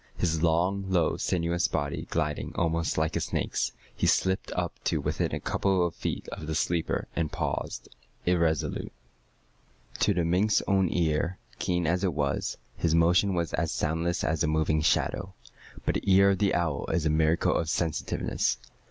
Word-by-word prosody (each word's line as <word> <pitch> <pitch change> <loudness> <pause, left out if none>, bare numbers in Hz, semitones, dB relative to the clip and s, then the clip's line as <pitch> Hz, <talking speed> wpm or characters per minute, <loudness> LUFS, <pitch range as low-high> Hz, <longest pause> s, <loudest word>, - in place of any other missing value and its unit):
His 80 -3 0
long, 90 +4 +2
low, 85 -4 +2
sinuous 85 0 0
body 70 -2 -3
gliding 75 -2 -2
almost 85 -1 0
like 80 0 0
a - - +2
snake's, - - -1 0.2
he - - 0
slipped 95 0 +1
up - - -3
to - - +1
within - - -1
a - - -2
couple 95 -3 +1
of 85 - -2
feet - - -4
of 75 - -7
the 80 - -2
sleeper, 85 +1 0
and 80 -2 -1
paused - - -3 0.4
irresolute. 85 -4 0 1.1
To - - +3
the 85 -2 +1
mink's 95 +5 +2
own 95 -2 +3
ear, 85 +1 0 0.2
keen 90 -1 0
as 90 +4 +1
it 90 -6 0
was, 70 -2 -1 0.2
his 80 -1 +1
motion 90 +4 +4
was 85 -2 -1
as 80 -1 0
soundless 80 +3 -1
as 80 0 +1
a - - +2
moving 75 0 +1
shadow. 95 +4 0 0.5
But - - +1
the 100 - 0
ear 100 +1 +6
of 95 - 0
the 100 -2 +2
owl 80 -5 -1
is 80 - 0
a 75 - +3
miracle 80 +1 +2
of 80 - 0
sensitiveness. 80 -2 -1
85 Hz, 170 wpm, -28 LUFS, 80-90 Hz, 1.1 s, ear